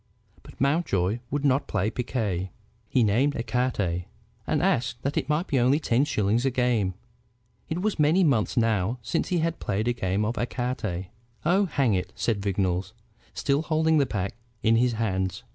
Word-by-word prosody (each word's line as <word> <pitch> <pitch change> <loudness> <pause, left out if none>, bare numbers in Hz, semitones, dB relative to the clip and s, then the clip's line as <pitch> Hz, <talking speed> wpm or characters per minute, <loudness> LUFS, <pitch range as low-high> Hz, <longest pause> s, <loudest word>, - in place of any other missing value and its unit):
But - - -15
Mountjoy 120 - +1
would 145 +1 -1
not 135 0 +2
play 105 +5 0
piquet. 105 -7 -2 0.4
He 125 - +3
named 125 +8 +2
ecarte, 115 -8 -1 0.4
and - - +1
asked 115 -1 +1
that 140 +2 -1
it - - -1
might 150 +4 +1
be 135 - +1
only 130 +5 +3
ten 130 -2 +2
shillings 110 -4 +1
a 135 - +3
game. 120 -7 +1 0.7
It 170 +4 -2
was 215 -5 0
many 155 +6 +4
months 130 -10 +1
now 115 -1 +1
since - - -1
he 180 - 0
had 165 0 -1
played 105 +3 -1
a 120 - +2
game 95 -1 -1
of 115 +3 -2
ecarte. 120 -7 -3 0.4
"Oh, 190 +5 +4
hang 135 - +1
it!" 95 0 -2
said 110 -4 -1
Vignolles, 95 -1 -1 0.4
still 140 0 +1
holding 160 0 +2
the 140 - +2
pack 100 -4 -2 0.3
in 115 +1 +4
his 120 0 +2
hands. 95 -1 -1
120 Hz, 175 wpm, -26 LUFS, 100-140 Hz, 0.7 s, many